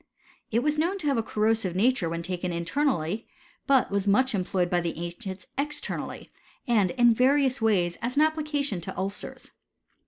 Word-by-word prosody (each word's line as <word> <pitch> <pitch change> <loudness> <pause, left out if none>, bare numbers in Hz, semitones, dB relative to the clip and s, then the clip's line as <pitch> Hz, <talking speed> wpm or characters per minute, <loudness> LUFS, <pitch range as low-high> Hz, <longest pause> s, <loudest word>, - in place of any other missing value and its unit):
It 230 +2 +1
was 300 +1 +1
known 350 +5 +1
to 350 - -7
have 280 -3 +2
a - - +2
corrosive 215 -4 0
nature 210 -3 +2
when 170 0 -3
taken 180 0 -3
in 170 0 -3
ternally; 220 - 0 0.4
but 270 -6 +3
w^is 200 0 0
much 255 +6 +3
employed 185 -2 0
by 175 0 +1
the 170 -2 -3
ancients 185 +2 -6
ex 295 +1 0
ternally, - - -6 0.4
and 215 -6 +3
in 240 0 +4
various 265 +1 +3
ways 185 -6 +2
as 240 +2 -2
an 300 - +5
application 295 - -1
to - - -7
ulcers. 195 +2 -4
220 Hz, 180 wpm, -27 LUFS, 180-275 Hz, 0.4 s, an